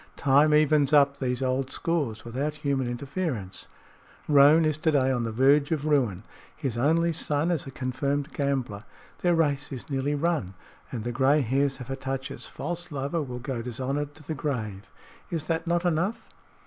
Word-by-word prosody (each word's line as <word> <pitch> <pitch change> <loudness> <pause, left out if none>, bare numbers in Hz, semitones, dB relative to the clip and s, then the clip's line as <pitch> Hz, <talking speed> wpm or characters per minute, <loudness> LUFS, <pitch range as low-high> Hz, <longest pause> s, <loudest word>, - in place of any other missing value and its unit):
Time 145 +2 +4
evens 150 -1 +4
up 140 -1 +5
these 125 0 -1
old 130 +1 0
scores 140 -12 -2
without 140 +6 -2
human 140 -3 -1
interference. 125 - -4 0.6
Roane 150 +2 +6
is 155 -1 0
to 160 0 +1
day 135 -3 +3
on 125 -2 0
the 115 - -3
verge 140 +6 +3
of 155 -2 -1
ruin. 125 -11 +1 0.3
His 135 -7 -3
only 165 +7 +2
son 150 +2 0
is 160 -5 -1
a - - -5
confirmed 140 +2 -2
gambler. 130 -8 -2 0.4
Their 175 -1 +2
race 145 -3 0
is 135 +3 -7
nearly 140 +2 0
run, 145 - -1 0.4
and 115 -4 -4
the 120 - -2
gray 135 +4 +3
hairs 135 +3 0
of 125 - -8
Hatatcha's 135 0 -4
false 175 +2 -5
lover 145 +4 -2
will 125 -4 -5
go 125 -1 -4
dishonored 135 +5 -3
to 155 - -14
the 160 - -4
grave. 110 -9 -4 0.4
Is 165 -3 -3
that 165 0 -2
not 175 +1 +1
enough?" 175 +6 0
140 Hz, 175 wpm, -27 LUFS, 130-155 Hz, 0.6 s, Roane